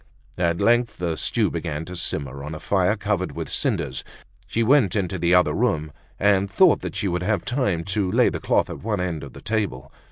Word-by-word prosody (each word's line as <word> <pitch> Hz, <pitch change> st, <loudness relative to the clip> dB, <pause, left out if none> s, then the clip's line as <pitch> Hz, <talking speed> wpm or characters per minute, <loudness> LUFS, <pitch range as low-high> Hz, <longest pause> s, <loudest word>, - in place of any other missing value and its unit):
At 85 Hz, -1 st, +1 dB
length 120 Hz, 0 st, +2 dB
the 85 Hz, -2 st, -1 dB
stew -, -, 0 dB
began 75 Hz, +2 st, -4 dB
to 90 Hz, -, -8 dB
simmer 70 Hz, -5 st, -3 dB
on 75 Hz, +2 st, -5 dB
a -, -, -7 dB
fire 100 Hz, +3 st, +1 dB
covered 100 Hz, -3 st, -2 dB
with -, -, -6 dB
cinders. 65 Hz, 0 st, -1 dB, 0.4 s
She 115 Hz, -, 0 dB
went 120 Hz, -6 st, +4 dB
into 95 Hz, -2 st, -1 dB
the 85 Hz, +2 st, +3 dB
other 90 Hz, -, +4 dB
room, 75 Hz, -1 st, 0 dB, 0.3 s
and 100 Hz, -1 st, +3 dB
thought 95 Hz, -, +3 dB
she 100 Hz, -, -1 dB
would 90 Hz, -1 st, -1 dB
have 105 Hz, +3 st, 0 dB
time 110 Hz, -10 st, 0 dB
to 95 Hz, -3 st, 0 dB
lay -, -, +4 dB
the -, -, -4 dB
cloth -, -, +1 dB
at -, -, -7 dB
one 105 Hz, -1 st, -1 dB
end 90 Hz, -4 st, -2 dB
of 70 Hz, -, -9 dB
the -, -, -11 dB
table. 100 Hz, -, -2 dB
90 Hz, 210 wpm, -23 LUFS, 80-105 Hz, 0.4 s, went